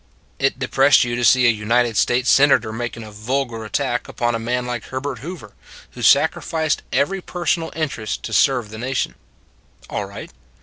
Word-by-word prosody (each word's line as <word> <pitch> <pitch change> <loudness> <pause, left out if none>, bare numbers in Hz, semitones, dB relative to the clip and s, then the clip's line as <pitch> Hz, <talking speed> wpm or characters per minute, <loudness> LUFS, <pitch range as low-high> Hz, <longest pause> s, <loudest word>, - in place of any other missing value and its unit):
It 135 -1 +1
depressed 135 +2 +4
you 120 -1 -2
to 120 - -2
see 125 +1 +5
a 120 - +6
United 115 +2 +1
States 125 +4 +2
Senator 130 -6 +4
making 115 0 -5
a 110 - -10
vulgar 115 +2 -3
attack 125 +2 -2
upon 120 0 -1
a 115 - -1
man 125 +2 -2
like 120 -2 -4
Herbert 130 -1 -5
Hoover, 145 - -9 0.4
who - - -10
sacrificed 160 -2 +2
every 190 +7 0
personal 170 -2 -2
interest 125 - -3
to - - -5
serve 125 -6 +2
the 110 - -8
nation. 130 +2 -2 0.8
All - - -2
right. - - -9
125 Hz, 170 wpm, -20 LUFS, 115-140 Hz, 0.8 s, a